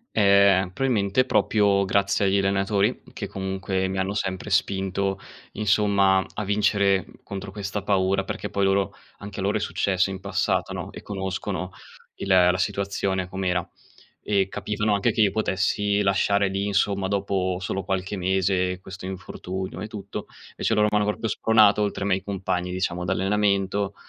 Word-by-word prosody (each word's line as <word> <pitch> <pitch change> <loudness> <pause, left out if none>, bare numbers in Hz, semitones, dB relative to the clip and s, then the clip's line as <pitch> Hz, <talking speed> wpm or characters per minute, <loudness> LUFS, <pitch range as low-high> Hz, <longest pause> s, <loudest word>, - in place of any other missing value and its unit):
Ehm, 100 -2 +5
probabilmente 110 +1 +1
proprio 100 -2 +2
grazie 100 +1 +1
agli 95 +1 +3
allenatori 100 +3 +1
che - - -5
comunque 95 0 -2
mi 95 0 -3
hanno 95 +1 -1
sempre 95 -3 -3
spinto 95 0 0 0.3
insomma 100 -2 +3
a 105 - -3
vincere 100 -1 +2 0.2
contro 95 0 -7
questa 100 0 -4
paura, 95 -1 +1
perché - - -5
poi 100 - -1
loro 95 -1 +1 0.3
anche 100 0 -8
a - - -2
loro 100 +2 +1
è - - -2
successo 95 -2 0
in 95 - -5
passato, - - -1
no - - -6
e - - -9
conoscono 95 -1 -4 0.5
il - - -6
la 90 -1 +5
situazione 95 0 -1
com'era. 90 -2 -1 0.5
E 100 -2 +1
capivano 105 +1 -1
anche 100 +3 +2
che 110 - +2
io 100 - +4
potessi 100 0 0
lasciare 100 0 +2
lì 95 +1 -2
insomma, 100 -1 +1
dopo 95 -2 -1
solo 95 +1 -3
qualche 95 +1 -2
mese 95 0 +1
questo 95 0 -9
infortunio 95 0 -6
e - - -4
tutto. 100 -2 -7 0.2
Invece - - -1
loro 105 0 +3
m'hanno 105 0 +2
proprio 105 +2 -1
spronato, 110 -2 +4
oltre 105 -1 -1
ai 100 - 0
miei 95 0 +1
compagni 95 -2 -2
diciamo 90 -1 -2
d'allenamento, 100 +1 +1
100 Hz, 155 wpm, -24 LUFS, 95-100 Hz, 0.5 s, Ehm